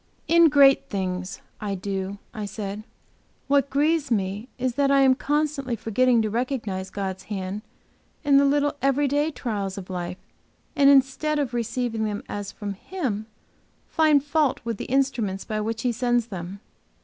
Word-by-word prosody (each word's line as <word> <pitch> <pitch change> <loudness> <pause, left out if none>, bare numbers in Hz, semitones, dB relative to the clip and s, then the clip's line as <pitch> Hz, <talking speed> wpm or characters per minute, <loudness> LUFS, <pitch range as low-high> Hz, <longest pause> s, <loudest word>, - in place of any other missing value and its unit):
"In 335 -1 +6
great 280 -2 +5
things 185 0 -3 0.2
I 205 -2 -3
do," 195 +1 -4 0.2
I 215 -3 -4
said. 205 0 -5 0.7
"What 280 -1 +3
grieves 300 +2 +1
me 205 0 -1
is 255 -1 -1
that 280 +1 +2
I 275 0 +5
am 265 -1 +6
constantly 285 -2 -1
forgetting 230 +2 +2
to 215 - -1
recognize 220 -6 -2
God's 190 -1 -4
hand 195 0 -4 0.6
in 285 -2 +5
the 280 - +5
little 290 +1 +2
every 275 +2 +2
day 290 +3 +1
trials 205 -9 -4
of 190 -1 -7
life, 180 0 -4 0.6
and 280 -1 +6
instead 280 +3 +3
of 275 -4 -1
receiving 235 -1 -1
them 205 -1 -3
as 205 -1 -5
from 205 -1 -5
Him, 220 - -4 0.6
find 310 -3 +4
fault 295 -2 +1
with 230 -2 -3
the - - -5
instruments 240 -8 0
by 215 -1 -2
which 225 +3 -3
He 250 - +2
sends 240 0 +1
them. 190 0 -7
240 Hz, 160 wpm, -25 LUFS, 200-280 Hz, 0.7 s, In